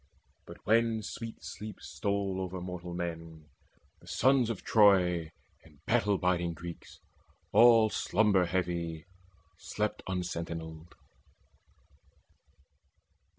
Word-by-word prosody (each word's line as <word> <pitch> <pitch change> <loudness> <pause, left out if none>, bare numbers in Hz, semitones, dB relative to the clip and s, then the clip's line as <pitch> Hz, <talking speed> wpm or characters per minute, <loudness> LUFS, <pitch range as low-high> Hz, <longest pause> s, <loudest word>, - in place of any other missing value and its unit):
But - - -10
when 115 0 +2
sweet 115 +1 -7
sleep 105 +2 -8
stole 100 -2 -2
over 95 0 -4
mortal 90 -1 -6
men, 80 -2 -6 0.5
Then - - -20
sons 130 -3 +3
of 115 - -4
Troy 90 -6 +4 0.3
and 80 -1 -22
battle 105 -4 +2
biding 85 -2 0
Greeks 85 0 -10 0.5
All 115 0 +6
slumber 105 -4 +2
heavy 85 -3 -2 0.5
slept 105 +5 -3
unsentinelled. 85 -3 -5
90 Hz, 95 wpm, -30 LUFS, 85-105 Hz, 0.5 s, All